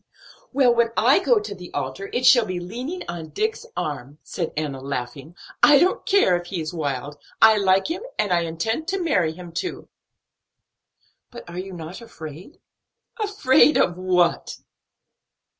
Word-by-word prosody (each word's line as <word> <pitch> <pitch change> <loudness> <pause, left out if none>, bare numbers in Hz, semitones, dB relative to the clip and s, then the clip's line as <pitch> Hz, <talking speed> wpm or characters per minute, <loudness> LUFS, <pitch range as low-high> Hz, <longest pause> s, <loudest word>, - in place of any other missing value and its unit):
"Well, 260 -3 +4
when 235 -1 +2
I 250 +6 +5
go 245 -4 +3
to 210 0 -3
the 180 -2 -11
altar, 145 +8 -4
it 250 - -1
shall 240 -4 +6
be 185 -1 -3
leaning 250 - -6
on 165 -2 -6
Dick's 440 +3 -3
arm," 145 -1 -4
said 170 -4 -4
Enna, 145 -4 -3
laughing. 140 +4 -6 0.3
"I 295 -1 +7
don't 360 +6 +1
care 390 - +4
if 175 0 -9
he 180 -1 -4
is 155 +1 -5
wild; 145 -2 -4 0.2
I 220 -1 +6
like 190 -1 +3
him, 340 +5 -3 0.2
and 205 - 0
intend 175 - -1
to 390 0 -1
marry 180 - +1
him 175 0 -11
too." 365 - -5 1.4
"But 240 - -11
are 175 +1 -7
you 190 +1 -6
not 170 +4 -8
afraid?" 175 - -11 0.6
"Afraid 310 -9 +4
of 175 - +2
what?" 180 -2 0
185 Hz, 160 wpm, -23 LUFS, 160-255 Hz, 1.4 s, I